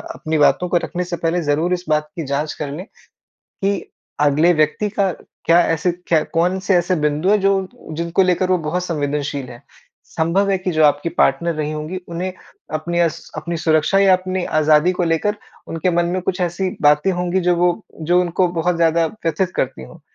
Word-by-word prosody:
अपनी 155 Hz, 0 st, -2 dB
बातों 175 Hz, +4 st, +3 dB
को 175 Hz, -, +3 dB
रखने 180 Hz, 0 st, -3 dB
से 175 Hz, -1 st, -4 dB
पहले 170 Hz, +1 st, 0 dB
ज़रूर 155 Hz, +5 st, +1 dB
इस 180 Hz, 0 st, -3 dB
बात 150 Hz, 0 st, +1 dB
की 165 Hz, -, -4 dB
जाँच 145 Hz, +2 st, -2 dB
कर 145 Hz, -2 st, -3 dB
लें 175 Hz, +7 st, -6 dB, 0.8 s
कि 200 Hz, 0 st, -1 dB, 0.3 s
अगले 150 Hz, +4 st, +4 dB
व्यक्ति 155 Hz, +6 st, +1 dB
का 200 Hz, -2 st, 0 dB, 0.3 s
क्या 170 Hz, +1 st, +5 dB
ऐसे 165 Hz, +2 st, +1 dB, 0.2 s
क्या 160 Hz, -2 st, +3 dB
कौन 180 Hz, +3 st, +1 dB
से 190 Hz, 0 st, +1 dB
ऐसे 175 Hz, +1 st, +1 dB
बिंदु 150 Hz, +5 st, +1 dB
है 210 Hz, -, +5 dB
जो 195 Hz, 0 st, +3 dB, 0.4 s
जिनको 170 Hz, +3 st, +1 dB
लेकर 180 Hz, 0 st, +1 dB
वो 185 Hz, -, +4 dB
बहुत 180 Hz, +3 st, -1 dB
संवेदनशील 145 Hz, -4 st, -3 dB
है। 120 Hz, -, -12 dB, 0.4 s
संभव 180 Hz, +5 st, 0 dB
है 195 Hz, -, +2 dB
कि 185 Hz, 0 st, -3 dB
जो 155 Hz, -1 st, +2 dB
आपकी 145 Hz, +3 st, +2 dB
पार्टनर 170 Hz, +5 st, +1 dB
रही 155 Hz, 0 st, -2 dB
होंगी 155 Hz, +4 st, -5 dB
उन्हें 180 Hz, +2 st, -4 dB, 0.4 s
अपनी 170 Hz, +3 st, -2 dB
अस 165 Hz, -2 st, -1 dB
अपनी 170 Hz, +2 st, -3 dB
सुरक्षा 160 Hz, +3 st, +2 dB
या 195 Hz, -1 st, +5 dB
अपनी 185 Hz, 0 st, -1 dB, 0.2 s
आज़ादी 155 Hz, +3 st, +4 dB
को 180 Hz, 0 st, -1 dB
लेकर 170 Hz, +5 st, 0 dB, 0.3 s
उनके 165 Hz, +2 st, -1 dB
मन 170 Hz, 0 st, +1 dB
में 180 Hz, +2 st, -1 dB
कुछ 185 Hz, 0 st, -2 dB
ऐसी 180 Hz, +2 st, -1 dB
बातें 150 Hz, +5 st, +4 dB
होंगी 180 Hz, +1 st, -1 dB
जो 175 Hz, -, +4 dB
वो 175 Hz, +1 st, +3 dB, 0.4 s
जो 180 Hz, -, +5 dB
उनको 180 Hz, +1 st, +1 dB
बहुत 175 Hz, +2 st, +1 dB
ज़्यादा 165 Hz, 0 st, +2 dB
व्यथित 185 Hz, 0 st, -2 dB
करती 65 Hz, -, -2 dB
हो। -, -, -14 dB
170 Hz, 195 wpm, -19 LUFS, 155-180 Hz, 0.8 s, क्या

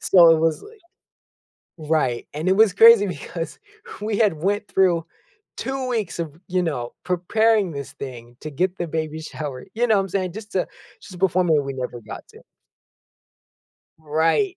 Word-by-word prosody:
So 175 Hz, -3 st, +6 dB
it -, -, 0 dB
was, 160 Hz, -1 st, +1 dB
like 435 Hz, +1 st, -14 dB, 1.1 s
right, 130 Hz, -7 st, +1 dB
and 155 Hz, +4 st, -4 dB
it 190 Hz, -, +4 dB
was 215 Hz, -2 st, +5 dB
crazy 225 Hz, -2 st, +7 dB
because 165 Hz, 0 st, -6 dB, 0.4 s
we 210 Hz, -1 st, -1 dB
had 210 Hz, -5 st, +3 dB
went 200 Hz, +6 st, -1 dB
through 175 Hz, -4 st, +2 dB, 0.5 s
2 265 Hz, -1 st, -3 dB
weeks 215 Hz, -8 st, -2 dB
of, 160 Hz, -3 st, -5 dB
you 185 Hz, 0 st, 0 dB
know, 125 Hz, -8 st, -3 dB
preparing 200 Hz, +2 st, +2 dB
this 140 Hz, -2 st, -7 dB
thing 120 Hz, -4 st, -9 dB
to 155 Hz, -, -5 dB
get 180 Hz, +6 st, -1 dB
the 175 Hz, -, -3 dB
baby 160 Hz, 0 st, -3 dB
shower, 145 Hz, -4 st, -6 dB
you 240 Hz, +2 st, +1 dB
know 220 Hz, -, +4 dB
what 195 Hz, -, +3 dB
I'm 190 Hz, -, -7 dB
sayin'? 185 Hz, -2 st, -2 dB
Just 210 Hz, +1 st, -9 dB
to 185 Hz, -, 0 dB, 0.3 s
just 190 Hz, -, -12 dB
to 180 Hz, -, -10 dB
perform 185 Hz, -1 st, +2 dB
it 160 Hz, -, +5 dB
when 145 Hz, -2 st, +2 dB
we 135 Hz, -, -4 dB
never 125 Hz, -2 st, -5 dB
got 110 Hz, -, -10 dB
to. -, -, -16 dB, 1.6 s
Right. 165 Hz, -, +1 dB
175 Hz, 180 wpm, -22 LUFS, 150-205 Hz, 1.6 s, crazy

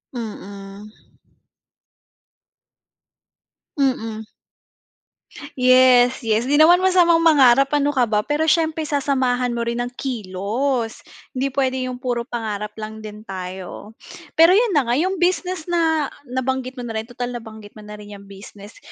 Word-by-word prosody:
Mm 200 Hz, -2 st, -8 dB, 2.9 s
Mm. 225 Hz, -5 st, -1 dB, 1.3 s
Yes, 255 Hz, 0 st, +5 dB
yes, 225 Hz, 0 st, 0 dB
di 275 Hz, -, -1 dB
naman 315 Hz, +4 st, +6 dB
masamang 360 Hz, -2 st, +4 dB
mangarap, 275 Hz, -6 st, +5 dB
ano 290 Hz, -1 st, +2 dB
ka 265 Hz, -4 st, +2 dB
ba, 210 Hz, -2 st, 0 dB
pero 295 Hz, +7 st, -1 dB
siyempre 320 Hz, 0 st, +1 dB
sasamahan 260 Hz, -4 st, 0 dB
mo 235 Hz, -, -2 dB
rin 235 Hz, +1 st, -2 dB
ng 245 Hz, -, -3 dB
kilos, 225 Hz, +2 st, -3 dB, 0.3 s
hindi 270 Hz, +1 st, -1 dB
puwede 260 Hz, -1 st, -1 dB
yung 250 Hz, -, -6 dB
puro 245 Hz, -2 st, -2 dB
pangarap 215 Hz, -3 st, -5 dB
lang 220 Hz, 0 st, -7 dB
din 215 Hz, 0 st, -10 dB
tayo. 190 Hz, +2 st, -8 dB, 0.4 s
Pero 330 Hz, +3 st, +7 dB
'yun 455 Hz, +4 st, +3 dB
na 280 Hz, -, +2 dB
nga, 235 Hz, -, 0 dB
yung 370 Hz, +8 st, 0 dB
business 360 Hz, -1 st, -1 dB
na 325 Hz, -4 st, 0 dB, 0.2 s
nabanggit 260 Hz, +1 st, -3 dB
mo 245 Hz, -, -6 dB
na 230 Hz, -, -6 dB
rin, 220 Hz, +2 st, -5 dB
tutal 245 Hz, 0 st, -5 dB
nabanggit 220 Hz, -3 st, -10 dB
mo 215 Hz, -, -13 dB
na 210 Hz, 0 st, -10 dB
rin 210 Hz, 0 st, -11 dB
'yang 200 Hz, 0 st, -13 dB
business, 200 Hz, +1 st, -13 dB
245 Hz, 140 wpm, -21 LUFS, 215-285 Hz, 2.9 s, Pero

